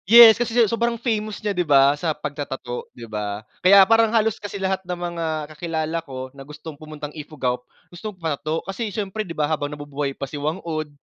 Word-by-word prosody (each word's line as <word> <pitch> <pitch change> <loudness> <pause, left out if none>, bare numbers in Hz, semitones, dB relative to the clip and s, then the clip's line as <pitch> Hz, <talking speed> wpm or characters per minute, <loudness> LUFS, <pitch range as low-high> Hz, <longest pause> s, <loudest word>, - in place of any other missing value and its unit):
Yes, 230 0 +11
kasi 240 0 -1
sa 235 - +7
sobrang 235 +2 0
famous 215 -3 -1
niya 205 - +1
'di 180 - 0
ba 140 -4 +5
sa 155 +1 -2
pagta-tattoo 140 -4 -5
'di 120 - -8
ba? 105 -1 -4 0.2
Kaya 195 +1 +8
parang 225 +2 +5
halos 225 -1 +1
kasi 205 0 -5
lahat 190 0 -1
ng 180 -1 -5
mga 170 -1 -3 0.3
kakilala 160 0 -2
ko 130 -4 -7
na 140 - -12
gustong 150 +3 -9
pumuntang 150 0 -8
Ifugao 145 -5 -3 0.3
gustong 200 +3 -7
magpa-tattoo 160 -1 -2
kasi 205 +3 -3
siyempre 205 +1 -3
'di 175 -6 -6
ba, 150 - +2
habang 145 -1 -1
nabubuhay 145 -1 -4
pa - - -3
si 145 +2 -7
Whang 155 +4 -1
Od, 155 -2 -3
160 Hz, 200 wpm, -23 LUFS, 145-200 Hz, 0.3 s, Yes